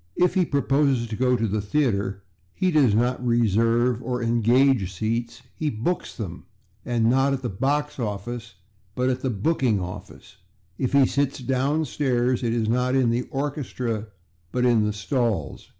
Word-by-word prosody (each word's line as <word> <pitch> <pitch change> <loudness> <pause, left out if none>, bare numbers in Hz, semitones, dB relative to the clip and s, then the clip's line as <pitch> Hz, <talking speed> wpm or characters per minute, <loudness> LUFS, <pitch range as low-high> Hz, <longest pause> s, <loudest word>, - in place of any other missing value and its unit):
If 180 0 +3
he 185 -2 +2
proposes 140 -3 +1
to 110 - -3
go 125 +2 +2
to 115 - 0
the 105 +1 -1
theatre 100 -5 -1 0.3
he 185 -1 +1
does 135 -10 +4
not 125 +2 +1
/reserve/ 115 +1 +2
or 125 0 -3
/engage/ 120 -1 +3
seats; 115 +5 -3
he 155 - -1
/books/ 125 +10 -3
them, 95 -8 -6 0.4
and 120 -2 +1
not 135 +3 +3
at 135 -1 -3
the 120 - -2
/box 145 +7 -1
office/, 105 +1 -5 0.4
but 125 +1 +1
at 130 0 -3
the 130 - -1
/booking 120 0 +1
office/. 90 0 -9 0.4
If 130 0 -1
he 140 -1 +6
sits 140 +1 0
downstairs, 130 -1 0
it 120 -2 0
is 115 -2 0
not 125 +3 +1
in 130 -3 +3
the 120 +2 -1
/orchestra/, 130 -6 -3 0.4
but 125 0 0
in 115 -3 +4
the 105 - 0
/stalls 105 - -2
125 Hz, 165 wpm, -24 LUFS, 110-135 Hz, 0.4 s, he